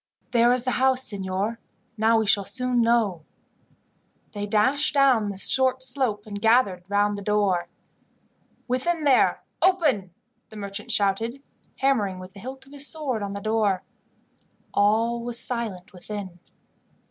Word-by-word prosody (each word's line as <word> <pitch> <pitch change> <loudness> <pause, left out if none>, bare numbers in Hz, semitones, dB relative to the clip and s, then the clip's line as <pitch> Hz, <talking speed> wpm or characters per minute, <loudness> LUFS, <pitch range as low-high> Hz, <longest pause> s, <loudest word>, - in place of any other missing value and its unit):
"There 240 0 +4
is 250 -1 +2
the 255 - -1
house, 260 -1 +4
signor. 200 +2 -2 0.4
Now 225 +1 +3
we 220 - +1
shall 200 -1 +3
soon 250 +3 0
know." 225 -8 +1 1.1
They 205 -1 -5
dashed 260 +9 +2
down 260 -7 +4
the 200 - -6
short 260 +5 +2
slope, 245 -5 0
and 205 -1 -7
gathered 205 -6 +2
round 205 0 +1
the 200 - -6
door. 200 -3 +1 1.0
"Within 305 +7 -1
there, 275 -3 +3 0.2
open!" 295 - +2 0.4
the 220 - -12
merchant 200 -1 -6
shouted, 225 +7 0 0.4
hammering 220 -9 +1
with 185 0 -11
the 200 - -12
hilt 265 +5 -8
of 270 - -19
his 285 0 -2
sword 280 -8 -2
on 200 -1 -4
the 200 - -5
door. 215 -3 0 0.9
All 225 +3 +2
was 240 0 -4
silent 230 -8 -3
within. 190 -1 -8
220 Hz, 145 wpm, -24 LUFS, 200-255 Hz, 1.1 s, There